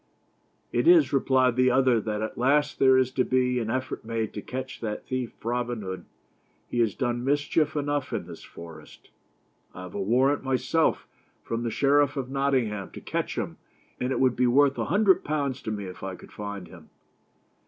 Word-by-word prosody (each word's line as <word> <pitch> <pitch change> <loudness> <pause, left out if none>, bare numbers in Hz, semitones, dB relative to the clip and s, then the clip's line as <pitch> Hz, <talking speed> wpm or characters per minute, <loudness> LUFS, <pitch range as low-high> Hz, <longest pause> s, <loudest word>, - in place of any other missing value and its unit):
"It - - +1
is," 340 - +6
replied 130 -2 +3
the 130 0 +4
other, 125 -2 +3
"that 105 0 -3
at 110 - -4
last 140 +4 +2
there 130 -1 +6
is 130 -1 +2
to 130 -1 +1
be 125 -1 +1
an 110 -2 -3
effort 130 +2 -3
made 110 -1 -3
to 105 - -5
catch 130 +3 -6
that 105 -2 -4
thief, 130 -2 -3
Robin 120 -2 -2
Hood. 95 -1 -6 0.6
He 120 - -3
has 115 -4 +2
done 120 -2 -1
mischief 145 +3 +1
enough 145 -1 -1
in - - -3
this - - -10
forest. 80 -2 -13 0.6
I 90 - -7
have 90 - -9
a 100 - -3
warrant, 130 +8 +2
myself, 135 +5 +1 0.4
from 115 0 -3
the 120 - -1
Sheriff 145 +3 +2
of 130 -1 -3
Nottingham 130 -8 0
to - - -8
catch - - -3
him; - - -3 0.4
and 125 +1 -1
it - - 0
would 130 -2 +3
be 125 0 +2
worth 140 +2 +4
a - - 0
hundred 200 -2 +3
pounds 140 -3 -2
to 110 - -4
me 100 -2 -4
if 90 -1 -9
I 95 -1 -5
could - - -15
find 100 -3 -6
him." 85 -3 -15
125 Hz, 195 wpm, -26 LUFS, 110-135 Hz, 0.6 s, is